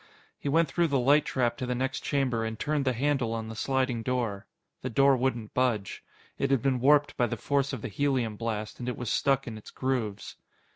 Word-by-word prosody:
He 145 - -3
went 165 +3 +3
through 170 -1 +1
the 140 -3 +1
light 140 +4 +4
trap 120 -2 0
to 125 - -4
the 125 - -1
next 130 +2 -1
chamber 130 -5 0
and 110 0 -3
turned 145 +3 -1
the 130 - +2
handle 125 -2 0
on 110 -1 -4
the 110 - -7
sliding 130 0 0
door. 115 -5 -2 0.3
The 130 - -3
door 135 +3 +4
wouldn't 120 -4 -2
budge. 120 -6 0 0.4
It 140 - +1
had 135 -3 +2
been 135 -2 +2
warped 145 +3 +4
by 120 - +3
the 115 - -3
force 140 +3 0
of 130 -6 -5
the - - -2
helium 125 -2 0
blast, 110 -1 -4
and 125 0 -3
it 125 - -4
was 120 -3 -3
stuck 135 -1 +2
in 110 -3 -6
its - - -13
grooves. 120 -6 -3
125 Hz, 225 wpm, -28 LUFS, 115-135 Hz, 0.4 s, light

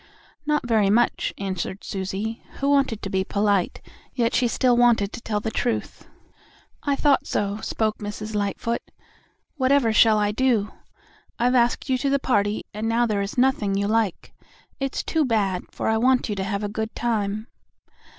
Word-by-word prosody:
"Not 300 -4 +1
very 215 -4 +3
much," 235 +4 +2
answered 190 0 -4
Susie, 200 +4 -4
who 280 +1 0
wanted 270 -6 +1
to 195 - -3
be 190 0 +1
polite, 200 -1 0 0.3
yet 235 -2 +1
she 245 0 +3
still 245 +1 +2
wanted 235 -4 +3
to - - -7
tell 215 -3 -2
the 220 +1 -3
truth. 240 0 -3 0.7
"I 285 -1 0
thought 285 -1 +2
so," 205 0 -1
spoke 220 0 -2
Mrs. 210 +1 -6
Lightfoot. 210 +3 -1 0.8
"Whatever 260 -4 +3
shall 220 0 +6
I 210 0 +1
do? 220 -3 +1 0.7
I've 245 +2 +2
asked 240 +1 +2
you 260 -2 +1
to 275 - 0
the 280 - +3
party 210 -6 0
and 215 +2 -2
now 235 +1 +2
there 210 -3 0
is 200 +4 -5
nothing 245 -6 +2
you 200 - 0
like. 220 -3 -1 0.5
It's 270 -1 -2
too 320 -1 +1
bad, 200 -8 0
for - - -4
I 220 - +2
want 255 0 +2
you 210 - -1
to 190 - -2
have 200 +1 -2
a - - 0
good 220 +2 -4
time!" 215 -2 -1
220 Hz, 175 wpm, -24 LUFS, 205-245 Hz, 0.8 s, shall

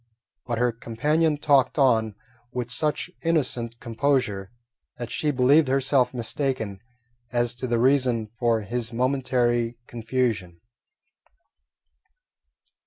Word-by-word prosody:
But 120 -2 -1
her 120 +1 +2
companion 150 +8 0
talked 145 -2 +3
on 110 -6 +3 0.4
with 125 -1 -4
such 150 +6 -1
innocent 125 -8 -1
composure 115 -5 -1 0.5
that 120 -1 -6
she 150 - 0
believed 140 +3 +4
herself 135 -1 +2
mistaken 120 -4 -3 0.5
as 120 -1 +1
to 125 +1 -4
the 120 -1 +1
reason 125 -3 +2
for 115 -2 +2
his 115 +2 -3
momentary 120 -2 0
confusion. 115 -7 -2
125 Hz, 105 wpm, -25 LUFS, 115-135 Hz, 0.5 s, believed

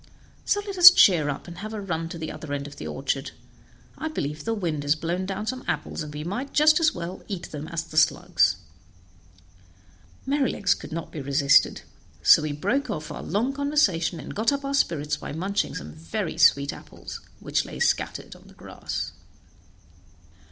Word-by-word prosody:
So 410 - +1
let 395 -3 -5
us 355 0 +13
cheer 175 - +5
up, 140 - -5
and 175 0 -9
have 215 +2 -6
a - - -4
run 165 -4 -3
to 170 - -7
the 160 -1 -5
other 150 -3 -7
end 140 0 -3
of 145 0 -10
the - - -6
orchard; 135 +1 -3 0.7
I 315 - -2
believe 150 - -4
the 225 0 0
wind 165 -8 -2
has 145 +1 +2
blown 175 +4 -3
down 195 +2 -4
some 255 +3 -4
apples, - - -3
and 150 -1 -6
we 150 0 -6
might 205 - -4
just 310 +2 +6
as 320 -2 +4
well 175 +1 -6
eat 185 -4 -6
them 150 0 -6
as 165 -1 -3
the 160 -2 -9
slugs." 90 - +3 1.7
Merrylegs 270 -9 +1
could - - -10
not 165 0 -5
be 155 - -6
resisted, 140 +1 +3 0.4
so - - +7
we 155 -1 -2
broke 205 - -1
off 155 -7 -4
our - - -6
long 225 +9 -1
conversation, 270 - +1
and - - -8
got 220 +6 +1
up 280 0 -3
our 275 - -2
spirits 150 - 0
by - - -7
munching 195 +6 -2
some 75 +2 -7
very 80 +1 -4
sweet 140 0 +4
apples - - -10 0.2
which - - 0
lay - - -9
scattered - - -1
on - - -18
the - - -17
grass. - - -5
170 Hz, 190 wpm, -25 LUFS, 150-225 Hz, 1.7 s, us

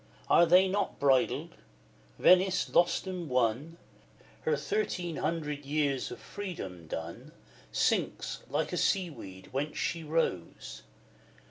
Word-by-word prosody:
Are 170 - +7
they 180 +3 +6
not 200 +2 -1
BRIDLED? 135 -3 +2 0.7
Venice, 185 0 +4
lost 175 +1 +3
and 180 -4 -5
won, 125 +6 0 0.6
Her 470 0 +1
thirteen 180 - -2
hundred 150 -3 -2
years 140 -2 0
of - - -8
freedom 95 - -7
done, 80 +1 -7 0.4
Sinks, - - 0
like - - -1
a - - -1
seaweed, 145 - -1
into - - -17
whence 145 +3 -3
she 165 0 -2
rose! 150 - -2
160 Hz, 120 wpm, -30 LUFS, 130-180 Hz, 0.7 s, Are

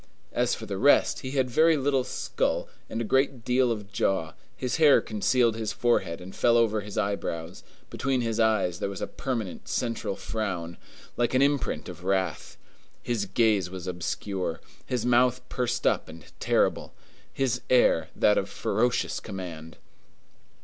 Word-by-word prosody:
As 120 0 +1
for 110 - -8
the 100 -3 -4
rest, 145 - +4
he 130 - -6
had 130 -2 +2
very 160 +5 +4
little 135 -1 +1
skull 125 - -2 0.2
and 115 - -3
a - - -1
great 135 0 +1
deal 125 0 +3
of 105 -2 -5
jaw; 95 -6 0 0.2
his 125 +2 -2
hair 155 -3 +7
concealed 115 +2 +1
his 110 -1 -3
forehead 95 -9 +1
and 95 +2 -10
fell 120 -1 +4
over 110 -2 +2
his 100 0 -8
eyebrows; 90 -5 -3 0.3
between 130 -1 0
his 115 -1 -2
eyes 105 -6 +2
there - - -2
was 100 - -5
a - - +1
permanent, 115 -9 -4
central 115 -4 -2
frown, 90 -7 -4 0.4
like 120 +1 +1
an 130 - +5
imprint 140 -1 0
of - - -9
wrath; 95 -4 -1 0.5
his 115 -4 -1
gaze 105 -4 +2
was 95 -1 -7
obscure; 90 0 -3 0.3
his 120 -2 -1
mouth 125 +1 +3
pursed 125 -2 -2
up - - +1
and 80 -1 -11
terrible; - - +1 0.4
his 125 -2 -1
air 105 -10 +4
that - - +4
of - - -4
ferocious 120 0 0
command. 85 -5 -8
110 Hz, 160 wpm, -27 LUFS, 95-125 Hz, 0.5 s, hair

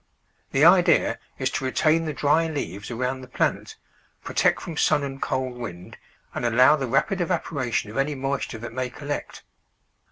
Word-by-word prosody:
The 135 +3 +3
idea 175 0 +5 0.2
is 130 0 -1
to - - -3
retain 160 +4 +2
the 155 - -2
dry 150 +4 +2
leaves 120 - -5
around 125 +2 -2
the 130 - -10
plant, 125 - -1 0.5
protect - - +2
from 165 - -7
sun 145 - +2
and 135 -1 -6
cold 130 -2 -2
wind, 90 -7 -8 0.4
and - - -4
allow 125 +5 +5
the 135 -4 -3
rapid 150 - +1
evaporation 145 - -1
of 115 - -8
any 140 +2 0
moisture 135 -3 -3
that 115 +1 -8
may 130 0 -2
collect. 145 +3 -6
135 Hz, 165 wpm, -24 LUFS, 125-155 Hz, 0.5 s, idea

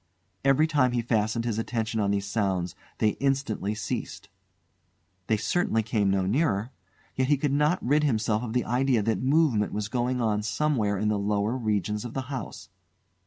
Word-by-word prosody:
Every 135 +3 +4
time 145 -6 +2
he 120 -1 0
fastened 115 0 0
his 115 -2 -1
attention 115 -1 -2
on 100 -1 +1
these 100 0 0
sounds, 95 -5 -1 0.2
they 110 - +3
instantly 135 -7 -1
ceased. 110 - -5 1.0
They 110 - +2
certainly 115 -3 0
came 105 -2 +1
no 95 -1 +1
nearer. 110 - 0 0.4
Yet 130 0 +1
he 145 +1 +3
could 140 0 0
not 150 +5 +1
rid 150 +4 +3
himself 110 -5 +1
of 115 -2 -5
the 125 -1 +1
idea 125 -2 +1
that 110 +1 0
movement 135 -6 +2
was 105 0 -3
going 125 +2 -1
on 110 -3 +1
somewhere 105 -1 0
in 105 +2 0
the 105 -1 0
lower 105 +3 0
regions 105 -3 -1
of 120 -1 -7
the 135 - -1
house. 125 -6 -6
115 Hz, 175 wpm, -27 LUFS, 105-130 Hz, 1.0 s, Every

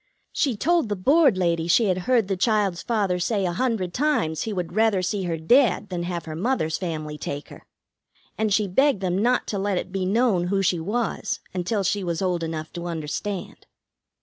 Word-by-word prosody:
She 255 -7 0
told 330 -1 +2
the 205 - 0
Board 270 - +4
ladies 170 -2 0
she 225 +6 +4
had 185 -2 +1
heard 235 -6 +3
the 195 - 0
child's 200 -3 +1
father 200 -6 0
say 195 +2 0
a 175 - -1
hundred 210 -5 -1
times 245 - 0
he 220 - -3
would 180 -4 -4
rather 215 -3 +2
see 190 +1 -1
her 165 -2 -2
dead 210 - +3
than 180 -2 -3
have 175 -1 -4
her 155 -1 -6
mother's 165 -5 -1
family 155 -4 -4
take 145 +1 -5
her. - - -14 0.7
And 220 -1 0
she 210 0 +2
begged 265 +3 +2
them 180 -2 0
not 245 +4 +2
to 200 - -2
let 195 -1 0
it 185 - -4
be 190 -1 -1
known 205 -4 +2
who 195 +1 +1
she 175 -2 +1
was 215 +7 -2
until 190 +3 -1
she 200 +2 0
was 170 -2 -2
old 180 -3 0
enough 160 -1 -5
to 175 0 -5
understand." 170 +4 -5
190 Hz, 200 wpm, -24 LUFS, 175-220 Hz, 0.7 s, Board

